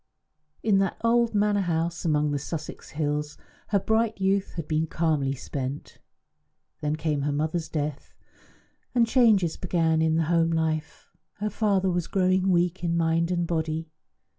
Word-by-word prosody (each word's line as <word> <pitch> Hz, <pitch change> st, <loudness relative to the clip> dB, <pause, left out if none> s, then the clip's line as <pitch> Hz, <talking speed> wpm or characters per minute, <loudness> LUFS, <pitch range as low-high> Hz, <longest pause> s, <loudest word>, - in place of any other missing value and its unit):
In 205 Hz, -3 st, +3 dB
that 195 Hz, -2 st, 0 dB
old 230 Hz, -1 st, +3 dB
manor 205 Hz, 0 st, +2 dB
house 170 Hz, -1 st, -1 dB
among 150 Hz, -2 st, +2 dB
the 145 Hz, -, -1 dB
Sussex 155 Hz, +2 st, -6 dB
hills 150 Hz, 0 st, -2 dB, 0.3 s
her 205 Hz, -, +2 dB
bright 220 Hz, +1 st, +1 dB
youth 195 Hz, 0 st, +1 dB
had 165 Hz, -3 st, -5 dB
been 155 Hz, +1 st, 0 dB
calmly 150 Hz, -5 st, 0 dB
spent. 135 Hz, +1 st, -6 dB, 0.8 s
Then 150 Hz, 0 st, -1 dB
came 155 Hz, -2 st, -1 dB
her 145 Hz, +1 st, 0 dB
mother's 155 Hz, +3 st, -1 dB
death, 150 Hz, -2 st, -4 dB, 0.8 s
and 235 Hz, -1 st, +5 dB
changes 220 Hz, -9 st, +3 dB
began 165 Hz, -3 st, +1 dB
in 160 Hz, 0 st, +2 dB
the 165 Hz, -, +2 dB
home 165 Hz, +1 st, +2 dB
life. 160 Hz, -1 st, -2 dB, 0.2 s
Her 210 Hz, 0 st, -3 dB
father 195 Hz, -3 st, +1 dB
was 175 Hz, -1 st, -1 dB
growing 185 Hz, 0 st, +2 dB
weak 175 Hz, 0 st, +1 dB
in 170 Hz, -1 st, +1 dB
mind 165 Hz, 0 st, +1 dB
and 175 Hz, -1 st, 0 dB
body. 160 Hz, -1 st, -2 dB
165 Hz, 155 wpm, -26 LUFS, 155-190 Hz, 0.8 s, and